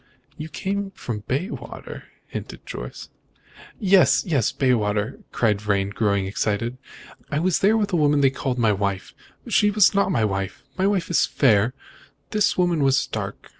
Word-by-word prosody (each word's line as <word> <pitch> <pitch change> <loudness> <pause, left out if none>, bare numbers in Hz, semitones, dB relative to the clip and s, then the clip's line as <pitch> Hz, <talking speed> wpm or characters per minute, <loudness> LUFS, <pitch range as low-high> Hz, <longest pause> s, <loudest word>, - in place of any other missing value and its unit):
"You 155 +1 -7
came 200 +4 -2
here 195 - -10
from 115 -4 -5
Bayswater," 160 - -5 0.2
hinted - - -8
Jorce. - - -8 0.7
"Yes, 190 - +4
yes, 145 - +1
Bayswater!" 105 -5 0
cried 105 -4 +1
Vrain, 100 -2 0
growing 100 -2 0
excited. 110 +5 -2 0.5
"I 145 - -1
was 175 +3 +1
there 215 +3 +4
with 205 -3 -1
a - - +3
woman 145 -2 +3
they 135 -1 +4
called 130 -1 -3
my 115 -3 +3
wife. 100 -1 -3 0.3
She 210 - +3
was 205 -1 +4
not 200 -1 +2
my 115 -9 +2
wife! 95 -2 -3
My 190 +1 +1
wife 190 -4 0
is 175 - +3
fair, 115 -1 +2 0.6
this 210 -1 +1
woman 175 -4 +2
was 135 0 +3
dark. - - -6
135 Hz, 165 wpm, -23 LUFS, -, 0.7 s, Yes